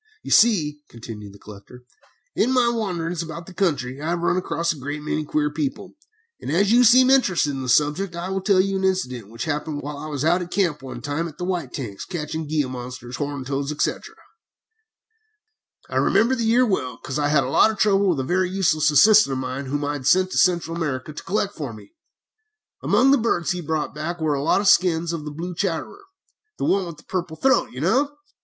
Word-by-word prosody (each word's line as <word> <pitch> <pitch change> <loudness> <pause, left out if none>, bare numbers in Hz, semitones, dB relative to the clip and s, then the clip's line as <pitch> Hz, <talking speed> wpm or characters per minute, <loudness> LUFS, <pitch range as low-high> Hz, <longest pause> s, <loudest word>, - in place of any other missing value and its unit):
"You - - -7
see," 160 -11 +4
continued 110 -3 -9
the 100 - -15
collector, 105 +5 -13 0.5
"in 250 - +2
my 250 -2 +3
wanderings 180 -7 -2
about 165 +1 -7
the 190 - -12
country 140 -8 -1
I 155 - -3
have 170 0 -1
run 175 - +1
across 170 -2 -1
a 150 - -12
great 145 +3 -5
many 155 0 -2
queer 150 0 -1
people, 150 -3 -4 0.5
and - - -5
as 195 +6 +2
you 245 +2 +6
seem 255 +2 +6
interested 190 - +3
in 135 -1 -5
this 125 -2 +3
subject, 160 +5 0
I 170 +2 -4
will 190 0 -2
tell 195 -1 +3
you 195 +1 +1
an 190 - -3
incident 130 - -1
which 115 +6 -6
happened 150 -1 -3
while 145 0 -6
I 155 - -7
was 145 -1 -3
out 175 +3 +3
at 175 - -6
camp 175 -6 0
one 135 - -8
time 145 +4 -2
at 155 -2 -12
the 180 - -4
White 175 -8 -3
Tanks, 105 -8 -6
catching 160 -2 -5
gila 145 -4 -1
monsters, 125 -1 -7
horned 145 -2 -4
toads, 140 +1 -2
etc. 150 - -3 1.7
"I - - -3
remember 235 +4 +3
the 235 -3 -1
year 240 +3 +4
well, 130 - -2
because 135 +3 -4
I 145 - +1
had 145 -1 +3
a - - -3
lot - - +5
of 220 - -4
trouble 200 -1 +3
with 165 -6 +1
a - - -3
very 180 +6 0
useless 170 -5 +2
assistant 180 +2 +6
of - - -2
mine, 130 +1 -4
whom 145 +2 -2
I 145 -1 -3
sent 185 +8 +3
to - - -3
Central 170 -2 +2
America 150 -3 -3
to - - -8
collect 205 0 -1
for 140 - -6
me. 110 - -14 0.9
Among 270 +2 +3
the 280 - +4
birds 195 -7 0
he 180 0 -3
brought 155 -1 -2
back 165 +4 -4
were 155 -2 0
a 140 - -1
lot 165 +6 +2
of 205 - -1
skins 170 -2 +3
of 155 -3 -5
the 150 - -5
blue 170 +4 -6
chatterer 190 - -3 0.5
the - - -2
one 190 -2 +1
with 165 -3 -8
the - - -17
purple 175 -3 -4
throat, 265 0 +2
you 125 - -8
know. 255 - +2
160 Hz, 225 wpm, -22 LUFS, 145-190 Hz, 1.7 s, you